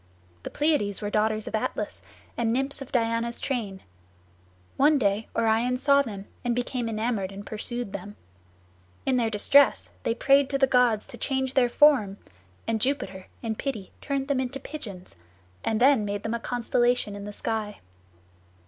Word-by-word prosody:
The - - -6
Pleiads 290 -10 +1
were 205 0 -4
daughters 215 0 0
of - - -6
Atlas, 215 - -2 0.3
and 230 -1 0
nymphs 270 +3 0
of 275 - -8
Diana's 230 -1 0
train. 215 -8 -3 0.9
One 295 +2 +4
day 205 -3 0
Orion 230 +2 +2
saw 280 +1 +4
them 205 -7 -6 0.2
and 240 -1 0
became 245 -1 -2
enamoured 215 -3 -1
and 200 +1 -9
pursued 235 0 -3
them. 200 +1 -7 0.9
In 260 -1 +2
their 230 -2 +1
distress 275 +7 +4
they 230 - -1
prayed 275 +2 +4
to 275 - 0
the 270 - +5
gods 250 -5 +3
to 240 - -11
change 265 0 -1
their 250 -3 +3
form, 240 -9 +4 0.5
and 225 -1 0
Jupiter 230 -8 -2 0.2
in 225 -1 -1
pity 215 -5 -5
turned 275 -2 -2
them 280 -2 +1
into 260 +1 -3
pigeons, 205 - -9 0.5
and 220 - 0
then 260 -3 +5
made 205 0 -3
them 225 - -2
a 235 - -1
constellation 240 -2 0
in 200 0 -7
the 205 - -6
sky. 215 0 -3
235 Hz, 165 wpm, -26 LUFS, 210-265 Hz, 0.9 s, the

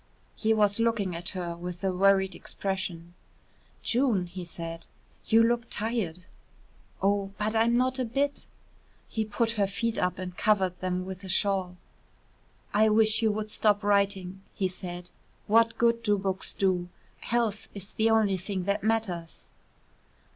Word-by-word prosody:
He 220 - 0
was 210 -1 +3
looking 225 -6 +1
at 175 +2 -1
her 170 -2 -3
with 175 +1 -7
a 190 -1 0
worried 195 0 +4
expression. 175 -3 -4 0.7
"June," 235 -7 +2
he 180 +1 -7
said, 165 -1 -6 0.4
"you 225 +1 +5
look 235 0 +1
tired." 210 -6 -2 0.8
"Oh, 200 0 +1
but 215 +1 -1
I'm 230 +1 +3
not 255 +1 +1
a - - +1
bit." 280 +4 -1 0.6
He 220 - -1
put 225 +2 0
her 200 - +3
feet 225 +4 -1
up 180 0 0
and 185 -1 -6
covered 195 -3 +2
them 185 0 -2
with 190 0 -7
a 190 - -7
shawl. 190 -2 0 1.0
"I 215 +1 +5
wish 215 +1 +3
you 220 -1 +3
would 215 0 -3
stop 210 -1 +2
writing," 200 -2 +1
he 195 -3 +1
said. 180 -1 -7 0.3
"What 225 +1 +4
good 235 0 +3
do 210 -3 +2
books 190 -1 -3
do? 180 -2 0 0.3
Health 230 -3 -1
is 200 0 -7
the 220 +1 +2
only 215 -4 +3
thing 185 0 -3
that 200 +2 -1
matters." 205 -7 -2
200 Hz, 155 wpm, -28 LUFS, 185-220 Hz, 1.0 s, you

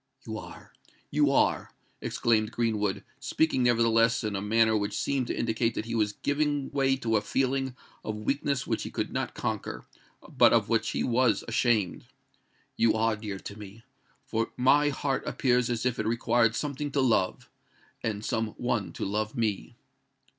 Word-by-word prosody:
"You - - -5
are—you 145 -1 -4
are," 140 - +2 0.3
exclaimed 110 -2 +1
Greenwood, 105 -5 -1 0.2
speaking 135 +1 +1
nevertheless 115 -1 +3
in 105 -2 -2
a 95 - -2
manner 110 +2 +3
which 100 -1 -1
seemed 135 -3 0
to - - -3
indicate 115 0 0
that 110 - -3
he 115 - -5
was 105 -2 +1
giving 145 +2 -1
way 135 -1 +2
to 115 -4 0
a - - 0
feeling 130 +3 -1 0.3
of 110 - -3
weakness 135 +4 -1
which - - -1
he - - -5
could - - -3
not - - -3
conquer, - - -4 0.4
but - - +5
of - - +2
which - - +1
he - - -1
was 125 -2 +2
ashamed; 115 -5 +1 0.7
"you 115 -1 +3
are 110 0 +2
dear 105 -2 -6
to 100 +1 -9
me—for 110 +2 -7
my 145 +4 +4
heart 140 -1 -1
appears 125 -2 +1
as 120 0 -2
if 125 0 0
it 110 - -1
required 115 0 +2
something 145 0 -3
to 145 - +1
love, 115 -8 +1 0.5
and 110 -1 -3
some 110 -1 -1
one 120 -5 -1
to - - -4
love 105 +5 -2
me." 110 -4 -2
115 Hz, 165 wpm, -28 LUFS, 110-130 Hz, 0.7 s, but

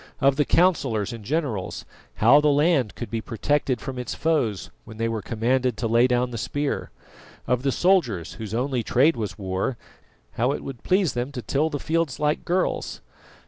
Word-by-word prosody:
Of 140 -1 +4
the 150 +1 +2
councillors 135 - +2
and 115 -2 -8
generals, 130 - -2 0.3
how 130 +7 +6
the 150 - +2
land 145 - +2
could 120 - -6
be 115 -1 -2
protected 130 +2 0
from 130 -2 -6
its 125 - -4
foes 130 - 0
when 110 - -12
they 115 0 0
were 115 -2 -2
commanded 120 +2 0
to 115 - -1
lay 115 +2 +4
down 125 0 +1
the 115 - -4
spear? 145 +5 -2 0.6
Of 125 -1 +1
the 135 +1 +1
soldiers, 130 - +1
whose 110 -1 -6
only 125 0 0
trade 130 +7 +3
was 110 -4 -4
war, 95 +4 -2 0.5
how 125 +4 0
it - - -5
would 135 -4 -7
please 185 -3 +2
them 125 +3 -3
to 125 -4 -5
till 145 +8 +1
the 145 - -3
fields 160 -2 -1
like 150 0 0
girls? 180 +2 -1
125 Hz, 185 wpm, -24 LUFS, 115-145 Hz, 0.6 s, how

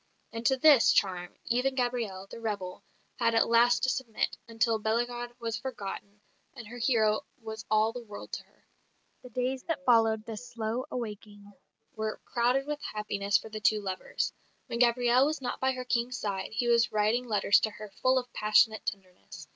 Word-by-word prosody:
And 230 0 -5
to 265 - +3
this 280 -3 +6
charm 180 -3 0
even 250 +3 +1
Gabrielle, 240 -7 -2
the 195 - -10
rebel, 200 -5 -4 0.4
had 230 -2 +2
at 225 - +4
last 235 +1 +4
to 260 - +3
submit, 235 -5 -2
until 225 -1 +1
Bellegarde 240 +2 -2
was 230 -1 -3
forgotten, 205 -4 -7 0.3
and 235 -4 -9
her 245 +3 -9
hero 220 -3 +2 0.2
was 220 -1 -7
all 215 +1 +3
the 245 - -6
world 210 -3 -10
to - - -5
her. - - -32 0.6
The 250 - -12
days 255 +2 -2
that 320 -5 -3
followed 225 -3 +4
this 225 +2 -7
slow 230 +2 -3
awaking 205 -3 -7 0.4
were 220 0 -3
crowded 250 +3 +1
with 295 0 -3
happiness 200 -2 0
for 220 - -9
the 215 0 -6
two 210 +1 +3
lovers; 190 -2 -3 0.3
when 235 - -4
Gabrielle 245 +2 +4
was 310 0 -2
not 260 - -4
by 265 0 +2
her 255 0 -6
King's 245 +1 0
side, 195 -2 -3
he 240 +2 0
was 235 0 +3
writing 215 +4 +1
letters 210 -2 +4
to 220 - 0
her 210 0 -10
full 255 0 +4
of 245 -1 -3
passionate 215 +1 +3
tenderness. 185 -3 -7
230 Hz, 180 wpm, -29 LUFS, 215-245 Hz, 0.6 s, this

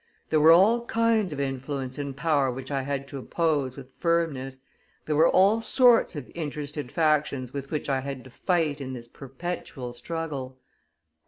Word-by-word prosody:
There 155 - +4
were 155 +2 +7
all 220 +8 +5
kinds 225 -4 +2
of 145 - -5
influence 135 0 -3
and 140 -2 -5
power 145 -4 +2
which 130 +2 -6
I 135 -1 0
had 140 0 -3
to 140 - -6
oppose 145 -3 -1
with 130 -1 -11
firmness; 150 -6 0 0.5
there 155 - 0
were 160 +3 +5
all 200 +5 +4
sorts 245 -5 +4
of 145 -4 -7
interested 150 -4 -5
factions 150 -5 +1
with 140 -1 -5
which 150 - -3
I 135 -2 +1
had 135 -1 -6
to 130 - -14
fight 160 -3 0
in 130 -1 -5
this 120 -2 -8
perpetual 135 -1 -6
struggle." 140 -2 -5
145 Hz, 170 wpm, -26 LUFS, 135-165 Hz, 0.5 s, were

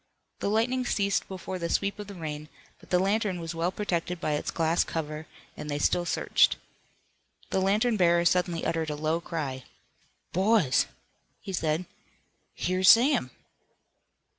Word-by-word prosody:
The - - -1
lightning 240 +4 +1
ceased 200 -4 0
before 185 -1 -6
the 170 -1 -3
sweep 200 +1 0
of 205 - -6
the 200 - -9
rain, 150 -3 -6 0.3
but - - -19
the 180 - +3
lantern 195 0 +1
was 165 0 -5
well 165 +2 -1
protected 180 -3 -2
by 155 - -1
its 150 - -1
glass 165 +1 +1
cover, 155 -1 -5 0.3
and 150 - -7
they 145 - -1
still 175 +4 +1
searched. - - +3 1.0
The 190 - +1
lantern 215 +4 +2
bearer 170 -2 +4
suddenly 175 -1 +1
uttered 165 -1 -1
a 150 - -2
low 155 +3 -1
cry. 140 -7 -4 0.7
"Boys!" 190 - +3 0.5
he 195 - -7
said, 160 0 0 0.7
"Here's 185 0 +2
Sam!" 240 - +5
175 Hz, 150 wpm, -28 LUFS, 160-200 Hz, 1.0 s, Sam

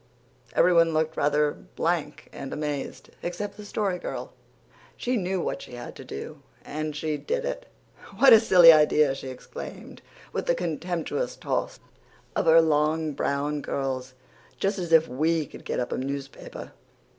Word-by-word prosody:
Everyone 170 -2 +4
looked 160 0 0
rather 150 0 +2
blank 160 -2 -3
and 135 -1 -7
amazed, 150 -2 -4
except 180 +4 -4
the 210 - -10
Story 200 -3 -2
Girl. - - -6 0.6
She 250 +1 -1
knew 190 -3 -1
what - - -3
she - - -11
had 120 - -8
to - - -9
do, 70 - -8 0.2
and 155 0 -4
she 150 0 -2
did 485 - -2
it. - - -4 0.5
"What 270 -3 +8
a 225 - +10
silly 180 -6 +8
idea!" 150 -2 +4
she 135 0 -7
exclaimed, 130 -1 -9 0.3
with - - -3
a 170 - +4
contemptuous 175 - -3
toss - - -3 0.6
of - - 0
her 165 +1 +8
long 155 0 +1
brown 145 +1 -1
curls. 130 -2 -3 0.4
"Just 195 0 0
as 175 -2 -4
if 160 0 +6
WE 155 +5 0
could - - -13
get - - -2
up 125 - -2
a - - -1
newspaper!" 135 +1 -6
160 Hz, 155 wpm, -26 LUFS, 145-180 Hz, 0.6 s, a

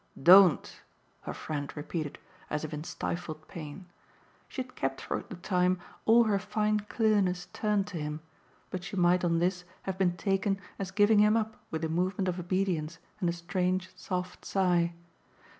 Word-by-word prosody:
"Don't!" 185 0 +7 0.4
her - - -5
friend 145 -2 -4
repeated 150 0 -4 0.3
as 150 0 -2
in 150 0 -5
stifled 160 -2 -5
pain. 160 +3 -8 0.6
She 260 - -3
had 255 - -19
kept 135 0 -2
for - - -3
the - - -9
time 180 0 +1 0.3
all 235 +2 +7
her 210 -3 +2
fine 215 +2 0
clearness 205 -5 +1
turned 210 -2 +1
to 175 - -5
him; 150 0 -4 0.5
but 185 -1 -4
she 180 - -6
might 180 0 +3
on 170 -1 +2
this 180 +1 0 0.2
have 190 0 -4
been 175 -2 +2
taken 195 +1 0 0.2
as 195 -2 -3
giving 205 +2 +4
him 210 +1 +5
up 220 -1 -2
with 160 0 -2
a - - 0
movement 185 +4 0
of 180 0 -1
obedience 175 -3 -1 0.2
and 180 -4 +1
a - - +2
strange 180 +2 -1
soft 180 0 -4
sigh. 175 -3 +2
180 Hz, 165 wpm, -30 LUFS, 170-195 Hz, 0.6 s, Don't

